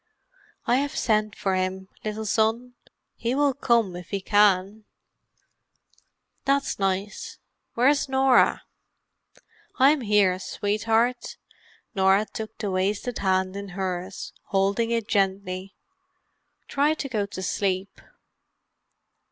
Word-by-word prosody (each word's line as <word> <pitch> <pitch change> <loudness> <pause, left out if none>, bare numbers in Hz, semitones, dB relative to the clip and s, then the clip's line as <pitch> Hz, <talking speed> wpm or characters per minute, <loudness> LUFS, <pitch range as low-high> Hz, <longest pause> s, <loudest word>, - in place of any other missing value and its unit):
"I 245 - +3
have 285 +1 -2
sent 215 -1 +1
for 195 - -1
him, 185 0 -2 0.2
little 215 0 -4
son. 225 +4 0 0.4
He 235 +2 -1
will 285 -1 +2
come 235 -8 +1
if 175 -1 -9
he 200 - -2
can." 205 +1 +2 1.6
"That's 275 -3 0
nice. 200 - -2 0.4
Where's 275 +4 +3
Norah?" 265 -1 +4 1.1
"I'm 280 +2 +5
here, 205 -4 +3
sweetheart." 225 +5 -1 0.6
Norah 195 +1 +3
took 220 0 -8
the 205 -3 -3
wasted 200 +6 -1
hand 190 -1 +1
in 200 0 -6
hers, 185 0 -4
holding 200 +4 +1
it 230 -2 -1
gently. 195 -1 -1 0.9
"Try 290 +3 +2
to 290 - -4
go 215 -6 -2
to 190 -2 -7
sleep." 190 0 -2
210 Hz, 110 wpm, -25 LUFS, 190-240 Hz, 1.6 s, I'm